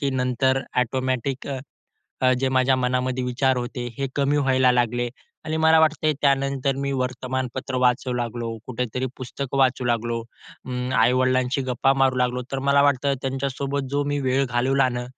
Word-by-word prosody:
की 140 -2 0
नंतर 130 +1 +1 0.2
ऑटोमॅटिक 130 +1 -1
अ, 135 - -3 0.6
अ, 130 - +5
जे 135 - +1
माझ्या 130 0 +3
मनामध्ये 125 0 -1
विचार 130 +1 +1
होते, 120 0 -4
हे 135 - -1
कमी 140 +1 +2
व्हायला 130 -2 +3
लागले 120 0 +1 0.4
आणि 155 0 -2
मला 160 0 +5
वाटतंय 155 -1 +2
त्यानंतर 140 -1 +1
मी 140 0 -2
वर्तमानपत्र 130 0 -3
वाचू 125 +1 +2
लागलो, 120 -1 -3
कुठेतरी 125 +1 -3
पुस्तकं 135 +1 -5
वाचू 130 -1 +2
लागलो, 115 0 0 0.5
अं, 125 0 -3
आई-वडिलांशी 130 +1 +2
गप्पा 130 +1 +1
मारू 135 -1 +2
लागलो. 125 0 0
तर 135 - -1
मला 140 0 +5
वाटतं 140 0 +2
त्यांच्यासोबत 135 +1 -2
जो 145 +1 +1
मी 145 0 -1
वेळ 130 +1 +1
घालवला 130 +2 +2
ना, 120 0 -3
130 Hz, 160 wpm, -23 LUFS, 125-135 Hz, 0.6 s, अ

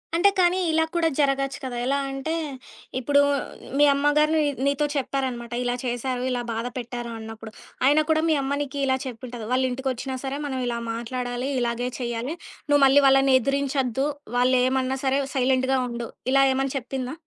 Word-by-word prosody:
అంటే 370 +4 +5
కానీ 360 +1 +4
ఇలా 320 0 +3
కూడా 330 -1 +3
జరగొచ్చు 275 -1 +1
కదా! 255 -2 -4
ఎలా 275 +2 +1
అంటే 270 +4 -3 0.7
ఇప్పుడు 285 +3 +3 0.6
మీ - - +7
అమ్మగారు 290 +2 +3
నీ 310 - +3 0.2
నీతో 280 +1 +1
చెప్పారనమాట. 260 -3 -2
ఇలా 245 0 0
చేశారు, 245 0 -2
ఇలా 250 -1 -1
బాధపెట్టారు 240 +1 -5
అన్నప్పుడు. 225 0 -9 0.3
ఆయినా 295 +3 +5
కూడా 315 0 +3
మీ 315 - +4
అమ్మ 275 +1 -1
నీకిలా 275 -2 0
చెప్పుంటది. 240 -2 -7
వాళ్ళింటికొచ్చినా 260 0 -1
సరే 275 +1 -3
మనం 265 -2 -3
ఇలా 235 -1 -2
మాట్లాడాలి, 245 +2 -3
ఇలాగే 240 +1 -1
చేయాలి. 240 +4 -3 0.3
నువ్వు 290 -1 +4
మళ్ళీ 270 +1 +6
వాళ్ళని 270 0 +5
ఎదిరించొద్దు 275 0 0 0.3
వాళ్ళేమన్నా 255 +1 +2
సరే 270 +1 +2 0.2
సైలెంటుగా 260 0 +2
ఉండు. 235 -1 -5 0.2
ఇలా 275 0 +5
ఏమన్నా 270 +1 -1
చెప్పిందా? 255 +1 -5
265 Hz, 150 wpm, -24 LUFS, 245-275 Hz, 0.7 s, మీ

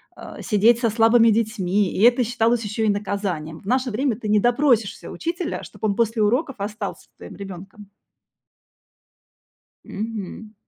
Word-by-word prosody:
а, - - -10
сидеть 225 +3 +3
со 230 -2 +1
слабыми 225 +1 +5
детьми, 210 -3 +1
и - - -2
это 245 +1 +5
считалось 230 0 +1
ещё 210 +1 -3
и 215 - +2
наказанием. 195 -6 -3
В - - -21
наше 255 +3 0
время 245 +1 0
ты 225 - -6
не 210 0 +4
допросишься 240 -3 +1
учителя, 335 +1 -4
чтобы 210 +1 -4
он 200 - -1
после 225 -1 0
уроков 255 +6 +1
остался 205 0 -5
с - - -39
твоим 200 - -11
ребёнком. 195 +2 -10 1.9
Мгм. 215 0 -6
220 Hz, 150 wpm, -22 LUFS, 200-240 Hz, 1.9 s, слабыми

